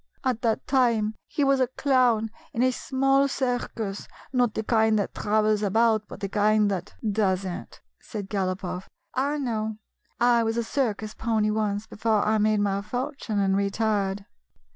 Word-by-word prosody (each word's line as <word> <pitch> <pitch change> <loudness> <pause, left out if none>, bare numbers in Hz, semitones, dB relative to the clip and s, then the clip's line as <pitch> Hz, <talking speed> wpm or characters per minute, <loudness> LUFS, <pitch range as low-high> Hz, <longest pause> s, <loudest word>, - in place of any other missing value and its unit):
At 255 -4 0
that 225 -2 0
time 235 -5 +2
he 300 - -1
was 275 -1 +3
a 255 - +3
clown 250 -4 +2 0.2
in 235 - +1
a 255 - +4
small 270 +2 +2
circus 245 -6 -3
— - - -22
not 245 -4 +2
the 220 - -1
kind 220 -1 +3
that 200 - -1
travels 215 0 +1
about, 215 +1 +2
but - - -10
the 200 - -1
kind 210 +1 +3
that 190 0 -4
— - - -30
" - - -11
" - - +1
Does 190 -1 +1
n't," 175 -10 -7 0.2
said 205 -3 -6
Galopoff. 185 -2 -3 0.2
"I 280 +3 0
know: 220 -5 -2 0.4
I 240 -1 +4
was 225 0 -1
a 235 - +1
circus 220 -4 -2
pony 220 -2 0
once, 210 -1 -1
before 215 -1 0
I 220 0 +2
made 215 0 +2
my 200 -1 0
fortune 245 +1 -4
and 195 -1 +2
retired." 200 -1 0
220 Hz, 180 wpm, -26 LUFS, 205-245 Hz, 0.4 s, a